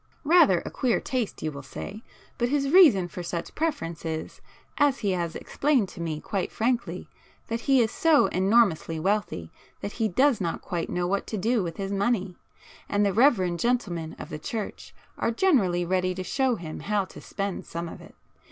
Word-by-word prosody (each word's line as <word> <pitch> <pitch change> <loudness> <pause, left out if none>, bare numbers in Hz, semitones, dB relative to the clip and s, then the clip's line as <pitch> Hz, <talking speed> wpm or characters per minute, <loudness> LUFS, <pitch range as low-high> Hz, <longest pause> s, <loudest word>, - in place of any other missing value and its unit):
Rather 295 - +5
a - - -5
queer 245 -4 +1
taste 250 -5 -3
you 155 - -1
will 140 -1 -8
say, 195 +9 -8 0.4
but 240 0 +1
his 275 0 0
reason 290 - +7
for 180 - -7
such 170 -1 -4
preference 170 - -2
is, 160 -1 -5 0.4
as 285 -2 +4
he 200 - +1
has 170 -3 -2
explained 275 -8 +1
to 170 - -9
me 160 -2 -3
quite 190 +3 -3
frankly, 240 +1 -1 0.4
that 230 +1 -1
he 270 -1 +6
is 225 - +1
so 320 -3 +4
enormously 190 -5 +2
wealthy 185 - -1 0.3
that 200 - -5
he 225 0 0
does 250 +3 +3
not 170 -2 -2
quite 175 -3 -4
know 175 0 -1
what 195 +2 -1
to 215 - -3
do 225 +4 +1
with 170 -3 -4
his 195 0 -3
money, 200 -2 0 0.5
and 205 0 +2
the 200 - +1
reverend 190 -8 +3
gentlemen 185 -10 -1
of - - -8
the 150 - -6
church 215 +6 -6 0.2
are - - +1
generally 225 - +2
ready 185 0 0
to 185 - -4
show 260 +4 +1
him 160 -6 -7
how 205 -1 0
to - - -12
spend 200 -2 -4
some 170 +1 -4
of - - -9
it. - - -15
200 Hz, 190 wpm, -26 LUFS, 175-240 Hz, 0.5 s, reason